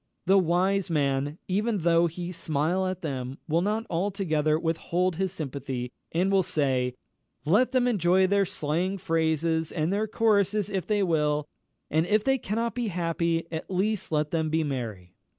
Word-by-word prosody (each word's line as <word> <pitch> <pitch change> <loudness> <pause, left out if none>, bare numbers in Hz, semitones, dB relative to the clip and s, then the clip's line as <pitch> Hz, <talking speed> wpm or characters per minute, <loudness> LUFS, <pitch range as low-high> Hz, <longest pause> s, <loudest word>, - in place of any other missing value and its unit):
The 195 +2 +5
wise 185 +2 +1
man, 145 -1 0
even 210 +4 0
though 170 0 +4
he 175 +2 -5
smile 170 +3 0
at 185 0 -4
them, 130 -3 -4
will 165 +2 +2
not 215 +4 -1
altogether 165 -4 0
withhold 170 +2 -1
his 190 -1 0
sympathy, 135 -6 -5 0.2
and 180 +4 +1
will 195 -1 +4
say, 130 -7 0 0.5
"Let 215 +11 +3
them 255 -2 +2
enjoy 190 -4 +3
their 200 +1 +2
slang 175 +4 -1
phrases 160 -2 0
and 165 +2 -1
their 215 +2 0
choruses 210 -2 +1
if 190 -2 -2
they 210 -2 +2
will; 150 -4 +1 0.4
and 160 +3 +2
if 215 +1 +2
they 270 +2 +2
cannot 230 +2 -2
be 245 -2 -2
happy, 170 -2 -1
at 160 -1 -5
least 195 +1 -1
let 150 -1 0
them 160 -2 0
be 160 +1 +1
merry." 110 -11 -5
170 Hz, 165 wpm, -27 LUFS, 155-195 Hz, 0.5 s, The